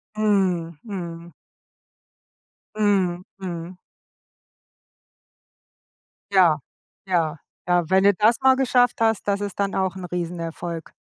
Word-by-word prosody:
Mhm, 185 -6 +1
mhm. 170 -5 -7 1.4
Mhm, 190 -4 +1 0.2
mhm. 175 -1 -6 2.5
Ja, 175 -6 +5 0.5
ja, 165 -3 0 0.3
ja, 175 -2 +2
wenn 190 +1 +4
du 200 0 +6
das 220 +5 +3
mal 265 0 +6
geschafft 250 -3 +2
hast, 225 -2 +1
das 200 0 0
ist 200 -1 -5
dann 200 0 0
auch 190 0 0
‘n 185 -1 -6
Riesenerfolg. 170 -1 -5
185 Hz, 105 wpm, -23 LUFS, 170-205 Hz, 2.5 s, du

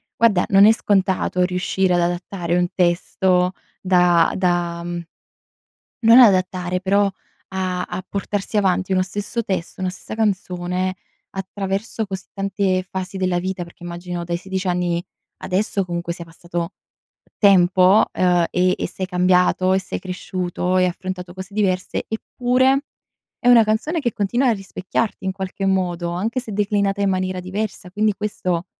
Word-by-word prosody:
guarda 210 -6 +3
non 195 -2 +6
è 220 - +8
scontato 190 -4 +1
riuscire 180 0 0
ad 175 - +3
adattare 175 0 -2
un 175 0 +2
testo 180 +1 +2 0.3
da 180 -2 +4
da 175 -2 0
mhmm, 175 0 -5 1.0
non 230 +2 +7
adattare 185 -4 +3
però 200 +1 +3 0.4
a 185 -1 -1
a 180 +1 -5
portarsi 205 +1 -2
avanti 190 -1 +1
uno 185 - +3
stesso 205 +5 -3
testo, 190 -2 -4
una 185 - 0
stessa 185 - -8
canzone, 185 -3 -1 0.4
attraverso 195 +3 -3
così 190 -2 -6
tante 195 -2 0
fasi 190 +1 -5
della 185 -2 0
vita, 185 0 -3
perché 170 0 -17
immagino 175 0 -5
dai 170 0 -2
16 190 +1 -4
anni, 175 -1 0 0.4
adesso 195 0 -1
comunque 170 0 -3
sia 170 0 -8
passato 170 +2 -5 0.7
tempo, 185 0 +5
ehm, 180 -2 +3
e 185 0 +2
e - - -2
sei 190 - -5
cambiato 180 0 +3
e 190 - +3
sei 190 - -5
cresciuto, 180 0 -3
hai 185 0 +4
affrontato 180 0 -5
cose 190 +1 -9
diverse, 190 -3 -1
eppure, 255 +4 +1 0.6
è 245 - +1
una 235 -2 +8
canzone 220 +11 0
che 240 -6 -1
continua 240 +6 +1
a - - +4
rispecchiarti 195 +1 -3
in 190 - 0
qualche 190 0 -5
modo, 175 -3 0
anche 220 +9 -2
se 230 -3 -8
declinata 200 -1 0
in 200 - +2
maniera 185 0 -1
diversa; 185 0 -5
quindi 210 +2 +1
questo, 185 -4 -2
185 Hz, 150 wpm, -21 LUFS, 180-200 Hz, 1.0 s, è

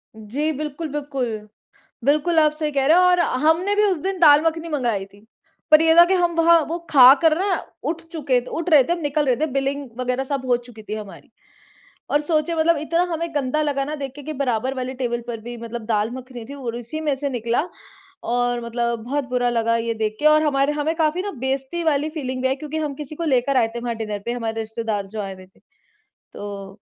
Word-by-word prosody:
जी, 260 +9 -2
बिल्कुल, 305 +2 -4
बिल्कुल। 260 -7 -4 0.6
बिल्कुल 305 +4 +2
आप 305 -1 +5
सही 305 0 -2
कह 270 -1 +1
रहे 320 +3 +6
हो 365 - +6
और 360 -1 +4 0.2
हमने 350 +6 +3
भी 420 - +4
उस 385 -4 +2
दिन 380 -1 -2
दाल-मखनी 325 +1 +4
मँगाई 240 -10 -1
थी। 205 +2 -20 0.4
पर 310 +1 +8
ये 325 0 +5
था 345 - +10
कि 375 - +1
हम 345 -2 +1
वहाँ 335 0 +5
वो 335 +2 -2
खा 260 -2 +9
कर 320 -1 +4
ना 385 - 0 0.4
उठ 330 0 -5
चुके 275 -6 +1
उठ 335 +2 -3
रहे 300 -4 +7
थे 340 - -1
हम 345 - -1
निकल 295 -1 0
रहे 250 -2 +3
थे 310 - 0
बिलिंग 275 0 -1
वगैरह 250 +1 -1
सब 275 -1 -3
हो 245 -1 +3
चुकी 240 -2 -13
थी 210 0 -6
हमारी। 210 -2 -9 0.8
और 295 - +2
सोचे 310 +1 0
मतलब 325 0 +3
इतना 335 +3 0
हमें 335 +1 -2
गंदा 290 +2 0
लगा 285 -2 0
ना 300 - -4
देख 275 -3 -5
के 290 - -9
कि, 310 - -5
बराबर 260 -2 -1
वाले 255 0 -4
टेबल 240 -2 -2
पर 230 -2 -4
भी 240 +1 -7
मतलब 230 -1 -7
दाल 215 0 0
मखनी 255 -2 -9
थी - - -6
और 245 -5 -5
इसी 245 +7 -6
में 295 -3 0
से 280 +1 -3
निकला, 235 +1 -1 0.6
और 245 0 0
मतलब 235 0 -1
बहुत 280 +3 -2
बुरा 245 -1 +1
लगा 230 -1 +1
ये 230 0 -1
देख 215 -1 -2
के 300 - -2
और 305 0 +6
हमारे 280 0 +1
हमें 300 +2 -1
काफ़ी 320 +2 +1
ना 405 0 -4
बेइज्जती 270 +5 -2
वाली 305 -1 +1
फीलिंग 260 -5 -4
भी 260 - +2
आई 265 - 0
क्योंकि 305 +2 -6
हम 300 -2 -2
किसी 300 +1 -7
को 335 - -4
लेकर 270 -2 +2
आए 230 -3 +3
थे 235 - -2
वहाँ 235 -1 -3
डिनर 215 -2 -4
पे 235 - -1
हमारे 225 -2 -3
रिश्तेदार 220 -2 -3
जो 215 +1 -5
आए 195 -1 -5
हुए 185 - -14
थे। 190 - -29 0.7
तो 200 0 -8
275 Hz, 230 wpm, -22 LUFS, 235-310 Hz, 0.8 s, था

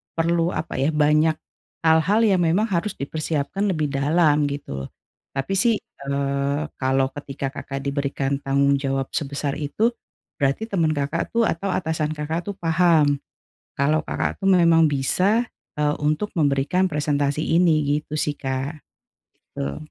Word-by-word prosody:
perlu 165 0 +1
apa 160 -4 -3
ya, 140 +4 +2
banyak 150 +1 +3 0.5
hal-hal 160 +8 +4
yang 195 -4 +4
memang 190 +7 +2
harus 180 +3 -1
dipersiapkan 155 +6 -2
lebih 155 -4 -1
dalam 150 +1 +3
gitu, 70 - -5 0.5
tapi 135 +8 -2
sih, 230 +1 +3 0.3
eee, 140 +1 0 0.2
kalau 135 0 +1
ketika 140 -1 -5
Kakak 135 -1 -6
diberikan 140 0 -1
tanggung 140 0 +2
jawab 135 -1 -2
sebesar 140 -1 -3
itu, 215 +11 0 0.5
berarti 140 +9 +1
teman 160 -5 +1
Kakak 145 +9 -2
tuh 235 - +4
atau 195 0 -1
atasan 160 -2 -1
Kakak 160 +5 -3
tuh 200 - -3
paham, 165 -4 +3 0.6
kalau 150 +3 +2
Kakak - - -3
tuh 195 - +2
memang 165 -3 +5
bisa, 185 - +1 0.3
eee, 150 0 +2
untuk 155 +8 0
memberikan 155 +4 +1
presentasi 145 0 0
ini, 155 -4 +3
gitu 155 0 -6
sih, 150 -1 0
Kak. 135 +2 -4 0.7
Betul. 70 0 -4
150 Hz, 140 wpm, -23 LUFS, 140-165 Hz, 0.7 s, memang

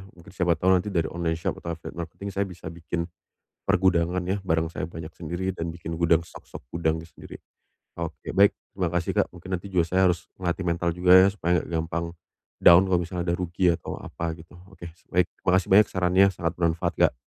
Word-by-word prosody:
mungkin 85 -1 -15
siapa 90 -3 +1
tahu 95 +4 +2
nanti 95 +2 +2
dari 85 -5 -1
online 85 -1 -1
shop 80 - -3
atau 85 -1 -4
affiliate 85 +1 -9
marketing 95 +4 -6
saya 100 +1 -1
bisa 85 -3 -9
bikin 85 0 -4 0.5
pergudangan 90 0 +2
ya, 95 +1 -1
barang 80 -2 -1
saya - - -4
banyak 80 0 -8
sendiri 85 +3 -4
dan 85 -2 -4
bikin 85 0 -6
gudang 85 0 +2
stok-stok 65 - -12
gudang 80 -1 0
sendiri. 85 - -12 0.6
Oke, 85 -1 -6
baik, 100 +1 +6 0.2
terima 90 -3 -1
kasih 90 0 -1
Kak, - - +1
mungkin 90 +1 -6
nanti 95 +2 -5
juga 85 -3 +2
saya 95 +1 +3
harus 90 0 -3
ngelatih 90 0 -3
mental 85 0 0
juga 90 +2 +4
ya 95 +1 +8
supaya 90 -3 0
enggak - - -11
gampang 85 +1 -3 0.5
down 85 +2 +8
kalau 90 - +4
misalnya 90 0 -3
ada 85 - +1
rugi 90 0 +1
atau 85 -1 -3
apa 80 -1 -5
gitu, 85 +2 -15
oke 95 -2 -19 0.3
baik, 90 -1 +3 0.2
makasih 95 +1 +2
banyak 105 +2 +7
sarannya 95 +1 +3
sangat 85 0 -3
bermanfaat, 85 -1 +1
Kak. - - +4
85 Hz, 200 wpm, -25 LUFS, 85-90 Hz, 0.6 s, ya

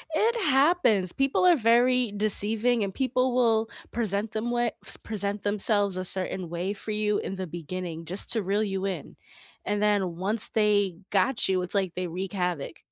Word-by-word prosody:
It 455 +7 +2
happens, 270 - +3
people 275 +6 +1
are 355 - +6
very 245 -1 +3
deceiving 215 +3 +2
and 195 -1 -4
people 255 0 0
will 225 -3 +2 0.2
present 215 -2 -2
them 225 +2 -3
way 240 -1 0
s - - 0
present 205 -1 -4
themselves 205 -1 +1
a 185 - -3
certain 185 -1 -1
way 175 +4 -3
for 210 +1 -7
you 210 0 0
in 195 - -4
the 190 -1 -4
beginning 170 0 -6
just 180 +5 0
to 225 -3 0
reel 200 +3 0
you 195 -2 -3
in, 195 -2 -5 0.5
and 205 0 -1
then 200 -4 +1
once 205 +5 +1
they 205 -4 +1
got 205 +5 +2
you, 185 -1 +1
it's 180 - -1
like 190 -3 0
they 185 - -2
wreak 185 +3 -5
havoc. 180 -6 -3
205 Hz, 180 wpm, -26 LUFS, 185-230 Hz, 0.5 s, are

